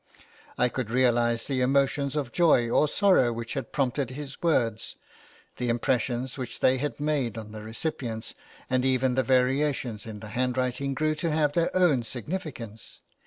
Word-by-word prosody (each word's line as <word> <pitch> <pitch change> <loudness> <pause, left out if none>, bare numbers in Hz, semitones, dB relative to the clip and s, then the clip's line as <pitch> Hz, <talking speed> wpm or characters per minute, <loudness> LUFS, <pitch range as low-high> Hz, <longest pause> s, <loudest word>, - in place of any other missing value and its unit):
I 125 - +4
could 125 -2 -4
realise 120 -1 +2
the 130 -2 -1
emotions 140 +2 +2
of 140 -5 -2
joy 155 -8 +4
or 150 - +4
sorrow 180 - +4
which 115 0 -5
had 135 - -4
prompted 135 -1 0
his 140 +1 -8
words, 120 -10 0 0.6
the 125 -1 -1
impressions 125 +2 0
which 125 -2 -5
they 130 0 +3
had 145 +2 -3
made 145 -7 -1
on 110 -1 -7
the 110 0 -8
recipients, 115 0 -4 0.3
and 130 0 +1
even 130 -1 +2
the 130 - +2
variations 130 -3 +1
in 105 -2 -7
the 110 0 -9
handwriting 130 +3 -1
grew 155 +3 +1
to 165 +2 -2
have 150 -2 +1
their 170 +1 +2
own 165 -9 +4
significance. 120 - -6
130 Hz, 165 wpm, -27 LUFS, 120-145 Hz, 0.6 s, I